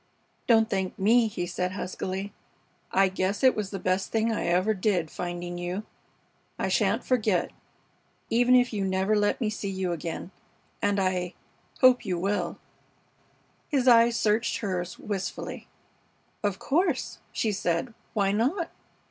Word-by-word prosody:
"Don't 225 -3 +5
thank 190 -3 -2
me," 225 +4 +4
he 190 -4 -3
said, 180 +1 -2
huskily. 190 +1 -4 0.6
"I 195 0 +4
guess 190 +4 -1
it 260 - +6
was 210 -3 -2
the 200 - -4
best 185 +1 -1
thing 225 +1 +1
I 220 - -1
ever 185 +5 +2
did, 185 -5 0
finding 175 0 -5
you. 180 +4 -3 0.7
I - - -1
sha'n't - - +2
forget, 220 -7 +1 0.8
even 245 +2 +4
if 245 -1 +3
you 205 -2 -1
never 190 +2 +1
let 205 0 +1
me 220 -4 0
see 205 -1 -4
you 190 -2 -2
again 170 +2 -5 0.5
and 205 0 +2
I 185 -2 -1 0.5
hope 255 -1 +6
you 185 -5 -1
will." 200 +4 -1 1.1
His 270 -4 +1
eyes 235 -1 +6
searched 220 +2 +1
hers 185 -4 -3
wistfully. 195 -2 -5 0.7
"Of 205 -3 0
course," 340 +5 0
she 220 - 0
said. 190 +3 -1 0.2
"Why 200 -2 +2
not?" 275 - 0
200 Hz, 145 wpm, -27 LUFS, 185-225 Hz, 1.1 s, it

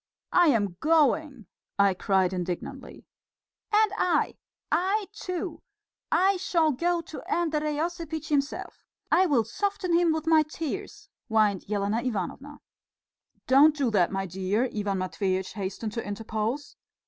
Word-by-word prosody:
"I 350 -1 +6
am 205 - +1
going!" 300 -5 +2 0.3
I 200 -1 +4
cried 190 -1 +1
indignantly. 180 -1 -5 0.7
"And 425 -1 +4
I! 355 -5 +1 0.4
I 395 +4 +1
too! 365 -5 -5 0.5
I 385 +1 +3
shall 335 -4 +2
go 340 +5 0
to 320 - -9
Andrey 305 -3 0
Osipitch 320 -2 -3
himself. 285 -1 -2 0.3
I 375 - +5
will 265 -8 +3
soften 380 - -2
him 340 -1 +4
with 315 0 -2
my 320 -1 +5
tears," 320 +5 -5 0.2
whined 215 -4 +2
Elena 205 +2 0
Ivanovna. 260 +6 -4 0.8
"Don't 290 +4 +6
do 275 -6 0
that, 185 -5 +3
my 195 0 -2
dear," 190 +7 -1
Ivan 205 -2 -1
Matveitch 185 0 -2
hastened 205 +2 -4
to 230 +2 -4
interpose. 220 +6 -3
280 Hz, 130 wpm, -27 LUFS, 205-330 Hz, 0.8 s, I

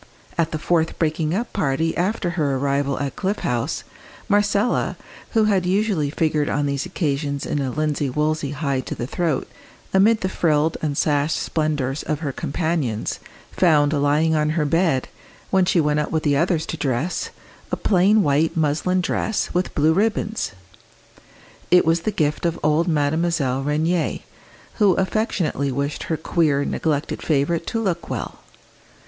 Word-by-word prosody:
At 165 -3 +1
the 155 - -2
fourth 160 +1 0
breaking 155 0 0
up 235 +4 -3
party 160 -3 0
after 180 0 0
her 150 -6 0
arrival 140 0 0
at 140 -1 -3
Cliff 200 +2 -1
House, 120 -1 -1 0.4
Marcella, 205 +2 +1 0.4
who 225 -2 +4
had 200 -4 +2
usually 190 -6 +1
figured 150 -1 0
on 145 0 0
these 140 +3 -2
occasions 140 -5 -2
in 145 - -1
a 135 - -1
linsey 150 0 -1
woolsey 150 +1 0
high 140 -2 -1
to 130 - -5
the 120 - -4
throat, 160 +1 -1 0.5
amid 210 +4 +4
the 185 - 0
frilled 160 -3 +1
and 145 -2 -2
sashed 150 +1 +1
splendours 150 -3 -1
of 155 0 -3
her 145 -4 -2
companions, 140 -6 -2 0.3
found 150 -4 +3
lying 150 +2 +2
on 150 -1 +2
her 150 - +2
bed, 160 -3 +1 0.4
when 190 -1 +4
she 180 0 +2
went 150 -1 +2
up 150 - -1
with 160 -1 -1
the 145 -2 +2
others 165 +2 +1
to 165 - -5
dress, 140 +4 -1 0.4
a - - 0
plain 200 +2 +3
white 155 +4 +1
muslin 160 +4 +1
dress 220 +4 -1
with 180 +1 -1
blue 155 +2 +4
ribbons. 215 - 0 1.2
It 180 0 +5
was 165 +1 +3
the 215 - -1
gift 155 -3 0
of 170 - -3
old 155 +3 +2
Mademoiselle 145 -3 +1
Rénier, 155 +3 0 0.6
who 205 -3 +5
affectionately 190 -8 0
wished 140 +3 -3
her 160 - -1
queer, 150 -3 +1
neglected 150 -2 -1
favourite 160 +3 0
to 230 - -1
look 185 -6 -2
well. - - -5
155 Hz, 160 wpm, -22 LUFS, 145-180 Hz, 1.2 s, It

